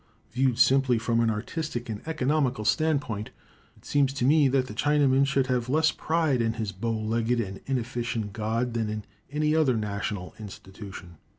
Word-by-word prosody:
Viewed 125 0 +1
simply 130 -1 +4
from 115 +1 0
an 115 -1 +3
artistic 120 +4 -3
and 110 -2 -5
economical 135 -6 0
standpoint, 140 -9 0 0.5
it - - -22
seems 140 -2 +2
to 130 -3 -1
me 145 +1 +5
that 130 -1 +2
the 105 - -8
Chinaman 140 +1 +3
should 135 -1 +2
have 125 -1 -1
less 155 +3 +3
pride 160 -6 0
in 115 -1 +1
his 110 -3 -3
bow 115 +5 -3
legged 115 +2 0
and 100 -4 -4
inefficient 120 -4 -2
god 115 +3 -1
than 115 -2 -1
in 105 0 -4 0.3
any 150 +1 +1
other 140 -7 +3
national 100 -3 -3
institution. 95 -3 -10
120 Hz, 170 wpm, -27 LUFS, 110-140 Hz, 0.5 s, me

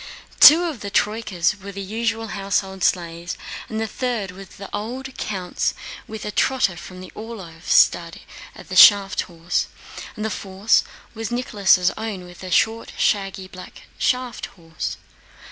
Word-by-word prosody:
Two 320 +4 +10
of 320 -8 -3
the 205 - -5
troykas 210 -3 0
were 200 +1 -7
the 200 - -8
usual 225 +2 -2
household 195 -1 -2
sleighs, 170 0 -1 0.3
the 220 0 -2
third 225 -4 -3
was 195 +1 -11
the 195 - -10
old 255 +6 -5
count's 185 -4 -2 0.3
with 220 0 -7
a 210 - -3
trotter 220 -6 +1
from 185 +2 -10
the 185 - -10
Orlóv 195 -8 -9
stud 170 +3 +3 0.4
as - - 0
shaft 200 -1 +7
horse, 170 +1 -1 0.5
the 215 +1 -2
fourth 195 +2 +1 0.3
was 225 -2 -5
Nicholas' 200 -6 +2
own 215 -4 -4
with 175 0 -13
a 185 - -7
short 225 +5 +1
shaggy 195 -2 0
black 185 0 -12 0.2
shaft 250 -2 -1
horse. 165 -2 -5
200 Hz, 145 wpm, -22 LUFS, 185-225 Hz, 0.5 s, Two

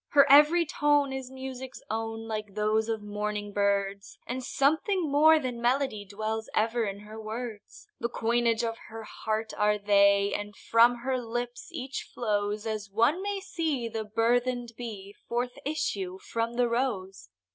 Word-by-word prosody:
Her 280 -1 +7
every 300 +4 +7
tone 290 -2 +2
is 265 -1 -5
music's 260 -1 -7
own, 225 0 -3
Like 215 -2 -5
those 215 +1 +1
of 220 -2 -2
morning 210 0 -3
birds, 200 0 0
And 255 +1 -4
something 315 - +1
more 310 +3 +7
than 250 -5 -3
melody 245 -4 +1
Dwells 215 +3 -4
ever 225 +1 +2
in 200 0 -5
her 215 +1 -9
words; 220 0 -7
The 235 - -1
coinage 235 0 +1
of 230 0 -2
her 225 0 -7
heart 220 +1 -3
are 210 0 +2
they, 200 -1 +4
And 205 0 -4
from 235 +2 +4
her 260 -1 +1
lips 240 +1 -4
each 260 +1 -4
flows 210 -2 -1
As 215 -2 -3
one 235 - +2
may 400 0 -2
see 320 -10 -2
the 225 -1 -3
burden'd 240 +3 +1
bee 205 -5 -7 0.2
Forth 245 +2 -2
issue 195 -11 -2
from 230 +4 -3
the 245 0 +3
rose. 215 - -2
230 Hz, 155 wpm, -28 LUFS, 210-255 Hz, 0.2 s, Her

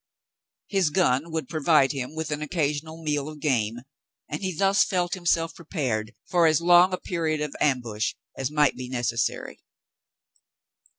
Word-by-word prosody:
His 195 -5 +1
gun 150 -2 +1
would 160 -4 -3
provide 155 -3 +3
him. 135 +1 -5
with 160 -1 -4
an 150 0 -2
occasional 155 +1 -2
meal 150 -1 -1
of 155 -1 -10
game, 120 -5 0 0.5
and 150 - -5
he 190 -1 -1
thus 195 +4 +3
felt 180 -2 -1
himself 170 -2 0
prepared 125 - -3
for 175 -2 +4
as 155 -1 +3
long 175 +2 +6
a 185 - -1
period 160 -4 -2
of 150 -2 -4
ambush 120 -6 0 0.2
as 135 -1 -2
might 150 -1 +2
be 125 0 -7
necessary. 120 -2 -2
150 Hz, 155 wpm, -25 LUFS, 135-170 Hz, 0.5 s, long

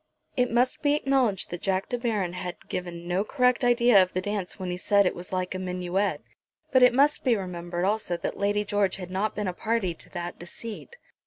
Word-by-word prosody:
It 250 -1 +2
must 245 +2 +1
be 290 0 +3
acknowledged 265 -9 +1
that 175 - -5
Jack 190 0 0
De 245 - 0
Baron 210 -7 -1
had 180 -1 -6
given 175 -1 -5
no 180 +3 +1
correct 250 +2 +2
idea 240 -4 +6
of 185 0 0
the 185 - 0
dance 200 -1 -3
when 185 -2 -4
he 180 - -3
said 200 +2 +3
that 180 - +3
it - - -9
was 175 +1 -7
like 185 -1 -2
a 185 - -4
minuet; 180 +2 -1 0.5
but 260 - +5
it 250 -1 +6
must 285 +3 +4
be 250 -3 +3
remembered 175 -2 -3
also 200 -4 0
that - - -4
Lady 205 +1 0
George 205 -1 +1
had 180 -2 -8
not 200 +3 -1
been 210 -2 -2
a 180 - -1
party 215 -2 -1
to - - -9
that 175 -1 -6
deceit. 225 - -8
195 Hz, 225 wpm, -27 LUFS, 180-235 Hz, 0.5 s, idea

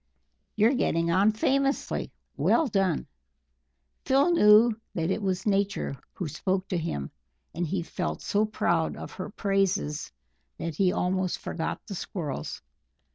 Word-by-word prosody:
You're 220 +4 +4
getting 170 -9 +1
on 195 +5 +4
famously. 275 +5 0 0.2
Well 325 - +3
done!" 195 - +1 1.0
Phil 275 +6 +3
knew 220 -6 +6 0.2
that 165 +1 0
it 220 - -1
was 190 -2 -1
Nature 200 -7 0 0.2
who 180 - -4
spoke 185 +5 -1
to 180 - 0
him, 70 - -3 0.4
and 170 +1 -2
he 175 +2 -1
felt 180 +1 -4
so 205 +1 +2
proud 170 -6 0
of - - -7
her 185 +3 -6
praises 195 -6 0 0.5
that 165 - -3
he 190 -2 +3
almost 185 0 0
forgot 160 - -4
the - - -7
Squirrels. 155 - -5
190 Hz, 135 wpm, -27 LUFS, 170-210 Hz, 1.0 s, knew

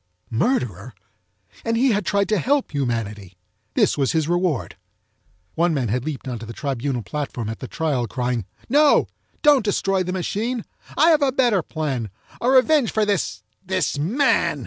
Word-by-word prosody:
Murderer! 120 - -1 0.7
And 230 0 0
he 260 +2 +3
had 205 -2 -1
tried 200 -1 +2
to 215 -2 +2
help 280 +1 +1
humanity. 105 -8 -3 0.4
This - - +2
was 135 +2 +1
his 160 -2 +1
reward. 175 -5 0 0.8
One 170 -1 +1
man 125 -6 -1
had 125 +4 -1
leaped 150 -4 -5
onto 120 -3 -5
the 115 - -7
tribunal 135 -3 -2
platform 130 -6 -4
at 115 - -5
the 130 - -6
trial, 145 -7 -1
crying, 125 -1 -2 0.2
"No! 290 +4 +5 0.4
Don't 290 -5 +6
destroy 195 -2 +1
the 180 0 -2
machine! 215 +6 -2 0.3
I 320 +3 +6
have 310 -2 +4
a 275 -2 +3
better 240 -7 +2
plan! 140 -9 -3 0.3
A 245 - +2
revenge 265 0 +4
for 215 -1 +1
this—this 190 -4 -2
man!" 225 - +2
170 Hz, 160 wpm, -22 LUFS, -, 0.8 s, Don't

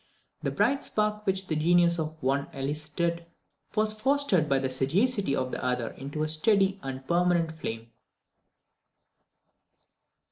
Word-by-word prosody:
The - - -1
bright 250 +7 +1
spark 210 0 -1
which 190 0 +1
the 160 - -2
genius 170 +2 +3
of 155 0 -4
the - - -9
one 140 +1 +1
elicited, 155 +5 -2 0.5
was 215 0 +3
fostered 215 - +1
by 135 - +3
the 135 0 0
sagacity 180 - +1
of 130 -1 -2
the - - -4
other 125 -2 -1
into 145 +3 -5
a - - 0
steady 195 +5 +3
and 135 -3 -5
a - - -26
permanent 170 +1 +1
flame. 115 -7 -6
165 Hz, 145 wpm, -28 LUFS, 140-195 Hz, 0.5 s, genius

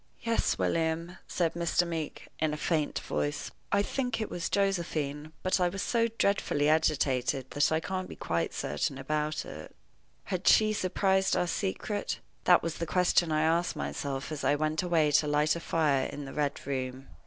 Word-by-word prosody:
"Yes, 230 -1 +1
William," 165 +2 -1
said 165 -2 0
Mr. 170 +1 +1
Meeke, 165 -3 -5
in 155 -1 +1
a - - -7
faint 155 -1 0
voice, 75 0 -2 0.2
"I 200 0 +3
think 250 0 -2
it 220 - -3
was 175 - -3
Josephine; 160 -7 -1
but 185 +1 +2
I 180 -1 +3
was 195 +2 -4
so 230 -1 +2
dreadfully 150 -7 +2
agitated 135 -4 +1
that 145 +1 +2
I 160 - +3
can't 185 +2 -4
be - - -8
quite 85 0 -1
certain 75 - -2
about 150 +3 -2
it." - - -9 0.5
Had 185 -1 -3
she 215 -1 +6
surprised 190 0 +2
our - - +2
secret? 200 +3 -2 0.3
That 180 - +6
was 165 0 -3
the 170 - -2
question 180 -2 +3
I 155 0 +2
asked 165 +2 +2
myself 140 0 -4
as 155 - -4
I 145 - +3
went 155 +1 0
away 165 -4 +2
to 150 - +4
light 150 +1 +2
the 170 - +2
fire 150 -5 +1
in 145 - -7
the 135 - -8
Red 145 -2 -2
Room. 130 -1 -4
160 Hz, 180 wpm, -30 LUFS, 145-180 Hz, 0.5 s, she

